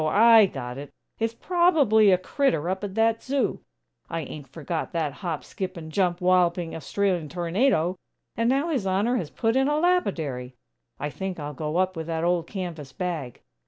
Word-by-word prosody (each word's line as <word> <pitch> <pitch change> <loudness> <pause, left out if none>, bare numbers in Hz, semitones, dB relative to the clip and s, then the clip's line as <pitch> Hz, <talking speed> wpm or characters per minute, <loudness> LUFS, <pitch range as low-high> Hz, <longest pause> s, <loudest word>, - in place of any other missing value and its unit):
I 220 +6 +6
got 125 -5 -6
it! 145 0 -8 0.3
It's 225 0 -1
probably 290 - +4
a 185 - +5
crittur 185 - 0
up 190 +2 -2
at 200 -1 -5
that 225 0 +2
zoo! 275 +1 -1 0.5
I 165 -1 -2
ain't 145 -1 -8
forgot 160 +4 -4
that 155 -4 -1
hop, 170 -4 -4
skip 185 -1 -5
and 160 -1 -8
jump, 180 0 +1
walloping 180 -2 +2
Australian 175 0 -1
tornado! 180 - +1 0.4
And 230 +1 +1
now 275 +6 +1
His 255 -11 -1
Honor 205 +7 +1
has 165 -9 -3
put 225 +5 0
in 265 +1 +3
a 295 +1 +1
lapidary!! 160 - 0 0.4
I 145 - -3
think 190 0 -5
I'll 145 0 -5
go 150 +3 -3
up 185 0 +1
with 160 -1 -5
that 165 -1 -2
old 170 -1 +1
canvas 170 -8 -6
bag! 165 - -4
180 Hz, 180 wpm, -25 LUFS, 160-225 Hz, 0.5 s, I